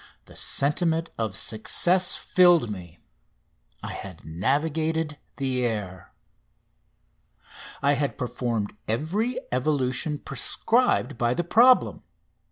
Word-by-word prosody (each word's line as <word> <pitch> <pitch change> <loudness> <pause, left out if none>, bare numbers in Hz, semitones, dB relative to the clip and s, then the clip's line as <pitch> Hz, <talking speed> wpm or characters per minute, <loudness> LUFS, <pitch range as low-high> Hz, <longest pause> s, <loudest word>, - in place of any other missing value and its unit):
The - - -16
sentiment 160 +3 +1
of 110 -2 -1
success 175 - +2
filled 175 -10 +3
me: 90 -4 -9 0.9
I - - -5
had 95 -4 -9
navigated 150 - -1 0.2
the 130 -2 -1
air. 100 -6 -4 1.7
I 140 +1 +4
had 140 0 -2
performed 120 -4 -3
every 190 - -1
evolution 130 +2 0
prescribed 145 - 0
by 120 +1 +1
the 175 - -1
problem. 245 +9 +4
140 Hz, 95 wpm, -25 LUFS, 115-165 Hz, 1.7 s, I